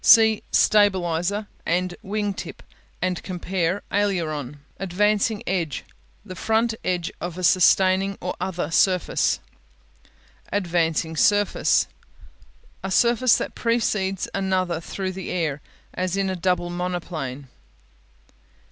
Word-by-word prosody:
See 220 -2 +7
"Stabilizer'" 195 -1 +2 0.2
and 180 +1 0
"Wing 205 0 -2
tip" - - -8 0.4
and 180 -1 -1
compare 185 0 -2
"Aileron." 155 -9 -1 0.2
Advancing 205 +3 +1
Edge 170 -7 -2 0.4
The 185 - -7
front 225 +4 +1
edge 175 -2 -1
of 175 0 -4
a 185 - -5
sustaining 190 +2 +4
or 180 - -3
other 180 -4 -2
surface. 180 +1 +2 1.1
Advancing 165 -4 0
Surface 205 +4 +3 1.0
A 190 - -3
surface 235 +4 +4
that - - -4
precedes 210 -5 0
another 185 -3 0
through 190 +3 -4
the 190 0 -6
air, 155 -5 -1 0.3
as 185 +1 -2
in 195 -1 0
a - - -2
double 180 -1 0
monoplane. 170 -7 -4
185 Hz, 110 wpm, -24 LUFS, 175-200 Hz, 1.1 s, See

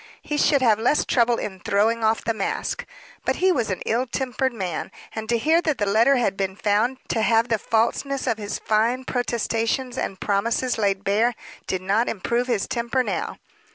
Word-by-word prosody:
He 295 - -3
should 280 -3 +3
have 220 -3 +4
less 250 +6 +2
trouble 240 -1 +2
in 190 -2 -5
throwing 220 +5 +1
off 220 +1 +2
the 230 - 0
mask. 200 -3 -3 0.4
But - - 0
he 375 +1 +3
was 240 -10 0
an 185 - -3
ill 245 +4 0
tempered 260 +1 -1
man; 190 -8 -4 0.2
and 220 0 -5
to 235 - +3
hear 320 +8 +3
that 310 -6 0
the 205 - 0
letter 225 +7 +4
had 235 -6 +1
been 190 -1 -2
found 210 +6 +1
to 225 - 0
have 225 +2 +3
the 225 -2 +1
falseness 245 +6 0
of 230 -4 0
his 205 -1 -3
fine 230 +4 +1
protestations 245 +1 -1
and 190 - -3
promises 230 +4 0
laid 200 -2 +1
bare, 220 +5 +2 0.3
did 185 -1 -2
not 205 +5 +1
improve 235 +4 -1
his 230 -6 0
temper 240 +2 0
now. - - -3
230 Hz, 190 wpm, -23 LUFS, 210-250 Hz, 0.4 s, have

